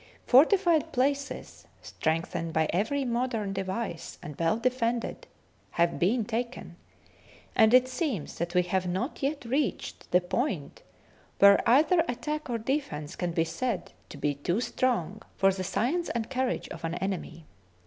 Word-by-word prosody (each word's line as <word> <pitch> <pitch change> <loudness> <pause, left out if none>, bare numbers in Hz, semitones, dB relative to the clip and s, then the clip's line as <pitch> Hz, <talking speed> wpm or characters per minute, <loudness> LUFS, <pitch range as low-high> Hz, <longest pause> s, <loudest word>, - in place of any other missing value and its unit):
Fortified 325 - +5
places, 280 +2 -2 0.2
strengthened 165 +1 -2
by 160 -1 +2
every 265 +10 0
mod 245 +1 -1
ern 205 -3 -2
device 190 -2 -4
and 150 - -7
well 165 +6 +2
defended, 245 - -1 0.5
have 170 0 +2
been 215 +6 +2
taken, 240 +3 -4 0.8
and 220 0 +6
it 255 +1 +6
seems 255 - -3
that 170 +2 -3
we 180 - +5
have 180 +1 -1
not 190 - -3
yet 280 -1 -2
reached 260 -2 -2
the 180 - +5
point 185 - -3 0.6
where 200 0 +7
either 315 +7 +5
attack 300 +4 -3
or 235 - 0
defence 220 - -3
can 175 -1 -2
be 165 0 +1
said 235 +3 -3 0.2
to - - -9
be 145 - 0
too 170 +8 -1
strong 230 -6 -1 0.2
for 195 0 +4
the 185 0 -4
science 310 - 0
and 230 +1 -3
courage 260 -1 -1
of - - -9
an 165 +1 -2
enemy. 175 -4 -4
230 Hz, 150 wpm, -28 LUFS, 180-260 Hz, 0.8 s, where